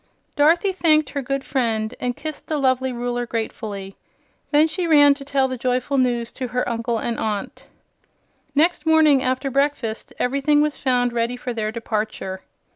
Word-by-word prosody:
Dorothy 330 Hz, +6 st, +4 dB
thanked 310 Hz, -6 st, +2 dB
her 280 Hz, -, -2 dB
good 275 Hz, +1 st, -2 dB
friend 225 Hz, -5 st, -1 dB
and 245 Hz, -1 st, -2 dB
kissed 310 Hz, 0 st, -7 dB
the 310 Hz, -, -1 dB
lovely 260 Hz, -1 st, +1 dB
Ruler 245 Hz, 0 st, -3 dB
gratefully. 210 Hz, -4 st, -5 dB, 0.5 s
Then 300 Hz, +1 st, +4 dB
she 345 Hz, +2 st, -2 dB
ran 290 Hz, -3 st, +6 dB
to 280 Hz, 0 st, -9 dB
tell 275 Hz, -1 st, +1 dB
the 255 Hz, -1 st, -5 dB
joyful 255 Hz, +2 st, 0 dB
news 240 Hz, -2 st, 0 dB
to 255 Hz, -, -5 dB
her 250 Hz, +1 st, -2 dB
uncle 230 Hz, 0 st, -1 dB
and 235 Hz, +1 st, -3 dB
aunt. 210 Hz, -2 st, -4 dB, 0.9 s
Next 320 Hz, +1 st, +2 dB
morning, 310 Hz, -4 st, +5 dB
after 260 Hz, +1 st, -1 dB
breakfast, 275 Hz, -5 st, -1 dB
everything 280 Hz, +3 st, +2 dB
was 300 Hz, 0 st, +1 dB
found 245 Hz, -2 st, +1 dB
ready 235 Hz, +1 st, -1 dB
for 245 Hz, 0 st, -4 dB
their 215 Hz, -2 st, -2 dB
departure. 215 Hz, -4 st, -4 dB
255 Hz, 165 wpm, -22 LUFS, 235-290 Hz, 0.9 s, ran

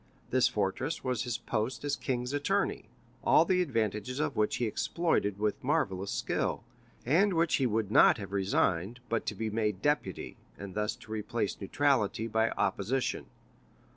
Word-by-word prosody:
This 130 Hz, 0 st, +4 dB
fortress 130 Hz, +6 st, -2 dB
was 125 Hz, -3 st, -1 dB
his 120 Hz, -2 st, -2 dB
post 115 Hz, +5 st, -3 dB
as 145 Hz, -, 0 dB
king's 125 Hz, 0 st, -2 dB
attorney, 145 Hz, 0 st, 0 dB, 0.4 s
all 165 Hz, -, +5 dB
the 180 Hz, +1 st, +2 dB
advantages 115 Hz, -, -1 dB
of 150 Hz, -2 st, -1 dB
which 105 Hz, 0 st, +1 dB
he 120 Hz, -, 0 dB
exploited 110 Hz, -, 0 dB
with 105 Hz, 0 st, -1 dB
marvellous 95 Hz, +1 st, 0 dB
skill, -, -, -1 dB, 0.4 s
and 180 Hz, -, +3 dB
which 165 Hz, 0 st, +3 dB
he 135 Hz, -, +2 dB
would 110 Hz, -2 st, -1 dB
not -, -, +6 dB
have 100 Hz, -3 st, -7 dB
resigned 95 Hz, +2 st, 0 dB
but 115 Hz, -1 st, -1 dB
to -, -, -2 dB
be 110 Hz, -1 st, -3 dB
made 105 Hz, -3 st, -1 dB
deputy, 145 Hz, 0 st, -1 dB, 0.2 s
and 100 Hz, -2 st, -8 dB
thus 105 Hz, +1 st, -1 dB
to 110 Hz, -, -14 dB
replace 110 Hz, -1 st, -2 dB
neutrality 115 Hz, -1 st, +1 dB
by 110 Hz, 0 st, +1 dB
opposition. 125 Hz, +7 st, -1 dB
115 Hz, 160 wpm, -30 LUFS, 105-135 Hz, 0.4 s, not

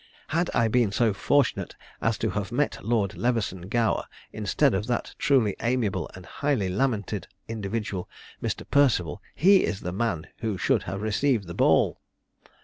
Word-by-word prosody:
Had 170 Hz, +3 st, +1 dB
I 115 Hz, -1 st, +4 dB
been 115 Hz, -2 st, +2 dB
so 110 Hz, +1 st, +2 dB
fortunate 140 Hz, +4 st, +1 dB, 0.3 s
as 115 Hz, -2 st, +1 dB
to -, -, -1 dB
have 105 Hz, 0 st, -3 dB
met 140 Hz, +4 st, -1 dB
Lord 105 Hz, -3 st, 0 dB
Leveson 105 Hz, -7 st, -1 dB
Gower 115 Hz, -1 st, +1 dB, 0.3 s
instead -, -, +2 dB
of 100 Hz, +3 st, -1 dB
that 120 Hz, -1 st, -2 dB
truly 125 Hz, -8 st, +3 dB
amiable 115 Hz, -8 st, 0 dB
and 95 Hz, -1 st, -11 dB
highly 135 Hz, -9 st, -1 dB
lamented 105 Hz, -1 st, -1 dB, 0.2 s
individual, 105 Hz, -3 st, -3 dB, 0.3 s
Mr. -, -, -3 dB
Perceval, 120 Hz, -, +3 dB
he 190 Hz, +4 st, +6 dB
is 100 Hz, -, -2 dB
the 90 Hz, -, -3 dB
man 95 Hz, -6 st, -1 dB
who 110 Hz, -5 st, -2 dB
should -, -, +2 dB
have 95 Hz, +2 st, -4 dB
received 110 Hz, 0 st, +1 dB
the 85 Hz, -, -7 dB
ball!" -, -, +3 dB
110 Hz, 155 wpm, -26 LUFS, 100-125 Hz, 0.3 s, he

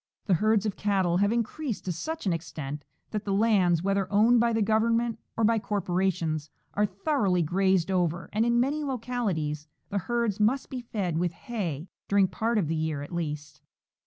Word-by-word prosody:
The 195 Hz, -, +2 dB
herds 215 Hz, +3 st, +3 dB
of 210 Hz, -, -1 dB
cattle 190 Hz, -4 st, +1 dB
have 200 Hz, +2 st, +3 dB
increased 235 Hz, -, -2 dB
to 185 Hz, -, -1 dB
such 315 Hz, -, -4 dB
an 185 Hz, -, +2 dB
extent 150 Hz, -3 st, -5 dB, 0.3 s
that 210 Hz, -1 st, -2 dB
the 200 Hz, -, -3 dB
lands, 190 Hz, -6 st, +3 dB
whether 195 Hz, 0 st, 0 dB
owned 225 Hz, +4 st, +5 dB
by 235 Hz, 0 st, +3 dB
the 225 Hz, -1 st, +2 dB
Government 230 Hz, +2 st, +1 dB, 0.2 s
or 225 Hz, -, +1 dB
by 225 Hz, +1 st, +4 dB
corporations, 180 Hz, -7 st, -1 dB, 0.2 s
are 210 Hz, +1 st, +2 dB
thoroughly 195 Hz, -, +1 dB
grazed 190 Hz, +2 st, +2 dB
over, 175 Hz, -2 st, 0 dB
and 215 Hz, +2 st, +2 dB
in 235 Hz, 0 st, +3 dB
many 285 Hz, +5 st, +1 dB
localities 215 Hz, -, -2 dB, 0.2 s
the 200 Hz, -, 0 dB
herds 235 Hz, 0 st, -1 dB
must 235 Hz, +6 st, +1 dB
be 255 Hz, -2 st, -4 dB
fed 195 Hz, -8 st, -2 dB
with 175 Hz, -1 st, 0 dB
hay, 175 Hz, -, -4 dB, 0.2 s
during 200 Hz, -1 st, +4 dB
part 225 Hz, +5 st, -1 dB
of 190 Hz, -7 st, +1 dB
the 165 Hz, -, -1 dB
year 155 Hz, -2 st, -2 dB
at 145 Hz, -, -9 dB
least. 150 Hz, -3 st, -4 dB
200 Hz, 185 wpm, -28 LUFS, 170-230 Hz, 0.3 s, owned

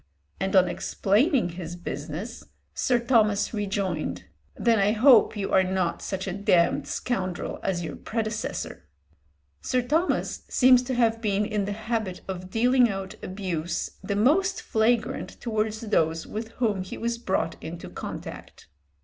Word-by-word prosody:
and 190 Hz, +1 st, -1 dB
on 185 Hz, -1 st, +6 dB
explaining 230 Hz, -, +1 dB
his 170 Hz, 0 st, -6 dB
business, 175 Hz, -, -6 dB, 0.3 s
Sir 250 Hz, -, +2 dB
Thomas 225 Hz, -4 st, +2 dB
rejoined, 200 Hz, -2 st, -2 dB, 0.3 s
"Then 230 Hz, -2 st, +3 dB
I 200 Hz, +2 st, +3 dB
hope 230 Hz, -2 st, +6 dB
you 200 Hz, -, -2 dB
are 190 Hz, -, +5 dB
not 185 Hz, -2 st, -1 dB
such 190 Hz, -1 st, -3 dB
a 190 Hz, -, -3 dB
damned 195 Hz, -4 st, +2 dB
scoundrel 185 Hz, -8 st, -3 dB
as 175 Hz, -2 st, -1 dB
your 155 Hz, -3 st, -5 dB
predecessor." 215 Hz, -, -4 dB, 0.7 s
Sir 255 Hz, -1 st, 0 dB
Thomas 315 Hz, +8 st, 0 dB
seems 255 Hz, -1 st, +6 dB
to 255 Hz, 0 st, -3 dB
have 230 Hz, -2 st, +2 dB
been 210 Hz, -1 st, +1 dB
in 210 Hz, -2 st, -1 dB
the 205 Hz, -, -2 dB
habit 220 Hz, -3 st, -3 dB
of 185 Hz, -1 st, -5 dB
dealing 245 Hz, +3 st, +4 dB
out 195 Hz, -1 st, -4 dB
abuse 175 Hz, -4 st, -3 dB
the 200 Hz, +1 st, -2 dB
most 340 Hz, -, +2 dB
flagrant 225 Hz, +1 st, 0 dB
towards 220 Hz, -1 st, -1 dB
those 165 Hz, -7 st, +1 dB
with 220 Hz, +1 st, -5 dB
whom 215 Hz, -6 st, 0 dB
he 185 Hz, -, -7 dB
was 235 Hz, 0 st, -2 dB
brought 190 Hz, -6 st, -1 dB
into 165 Hz, +1 st, -7 dB
contact. -, -, -8 dB
210 Hz, 145 wpm, -26 LUFS, 185-235 Hz, 0.7 s, on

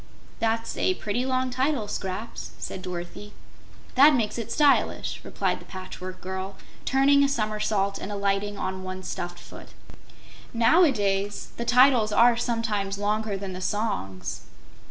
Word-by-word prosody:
'" -, -, -25 dB
"That's 225 Hz, 0 st, -1 dB
a 370 Hz, -, +2 dB
pretty 240 Hz, -, -2 dB
long 255 Hz, 0 st, 0 dB
title, 260 Hz, -3 st, 0 dB
Scraps," 200 Hz, +2 st, -5 dB
said 190 Hz, -, -6 dB
Dorothy. 180 Hz, +3 st, -7 dB, 0.6 s
"That 285 Hz, +3 st, +7 dB
makes 230 Hz, -1 st, -1 dB
it 230 Hz, -, -5 dB
stylish," 290 Hz, -2 st, +2 dB
replied -, -, -2 dB
the -, -, -13 dB
Patchwork 185 Hz, 0 st, -8 dB
Girl, 190 Hz, +1 st, -5 dB, 0.3 s
turning 280 Hz, +1 st, +4 dB
a 280 Hz, -, +3 dB
somersault 215 Hz, -4 st, 0 dB
and 205 Hz, -, -6 dB
alighting 200 Hz, 0 st, -1 dB
on 185 Hz, 0 st, -3 dB
one 185 Hz, 0 st, -6 dB
stuffed 175 Hz, -1 st, -5 dB
foot. -, -, -12 dB, 0.9 s
"Now 235 Hz, +10 st, +5 dB
a 315 Hz, -, +5 dB
days 200 Hz, -2 st, -1 dB
the 235 Hz, -, -3 dB
titles 245 Hz, -2 st, +5 dB
are 235 Hz, +3 st, +5 dB
sometimes 220 Hz, -4 st, -1 dB
longer 210 Hz, 0 st, -1 dB
than 195 Hz, -1 st, -6 dB
the 185 Hz, -, -7 dB
songs." 100 Hz, -, -2 dB
210 Hz, 150 wpm, -26 LUFS, 195-240 Hz, 0.9 s, That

